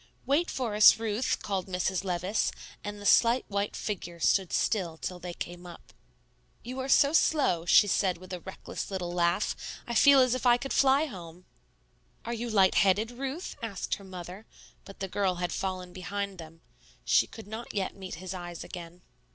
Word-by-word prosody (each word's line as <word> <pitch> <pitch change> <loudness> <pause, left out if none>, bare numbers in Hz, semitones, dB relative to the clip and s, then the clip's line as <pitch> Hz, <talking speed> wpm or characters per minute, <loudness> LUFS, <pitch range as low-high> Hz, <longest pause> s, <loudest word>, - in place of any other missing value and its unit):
"Wait 300 +6 +2
for 245 -5 -2
us, 210 +1 +8
Ruth," 225 +2 -1
called 195 -2 -2
Mrs. 185 0 -1
Levice, 185 +2 0 0.3
and 205 0 -6
the 205 - -9
slight 235 +4 +4
white 200 0 -2
figure 175 -5 -5
stood 190 +2 +2
still 175 -7 0
till 180 +2 -5
they 175 -1 -7
came 175 +1 -7
up. 170 - -13 0.7
"You 255 +2 -6
are 260 +1 -4
so 280 +2 +5
slow," 265 - +2
she 205 - +7
said 190 -2 +1
with 185 +1 -11
a 180 - -4
reckless 190 +2 -7
little 180 -3 -4
laugh; 175 +3 +1 0.3
"I 240 - -4
feel 280 +4 +7
as 255 -2 +4
if 255 - -3
I 245 -1 +5
could 270 +2 -4
fly 275 +2 +4
home." 180 - -10 0.8
"Are 235 - -3
you 235 +1 -4
light 195 -4 +4
headed, 200 +4 +3
Ruth?" 270 +8 -5
asked 215 -5 -4
her - - -12
mother, 185 +2 -9 0.4
but 195 - -13
the 195 - -2
girl 190 -1 0
had 175 0 -3
fallen 185 -2 -4
behind 200 +1 -4
them. 165 0 -11 0.4
She - - +4
could 225 - -11
not 220 +3 -7
yet 195 -2 -2
meet 190 -1 -7
his 185 +3 -7
eyes 175 -2 -7
again. 175 0 -10
195 Hz, 185 wpm, -29 LUFS, 180-230 Hz, 0.8 s, us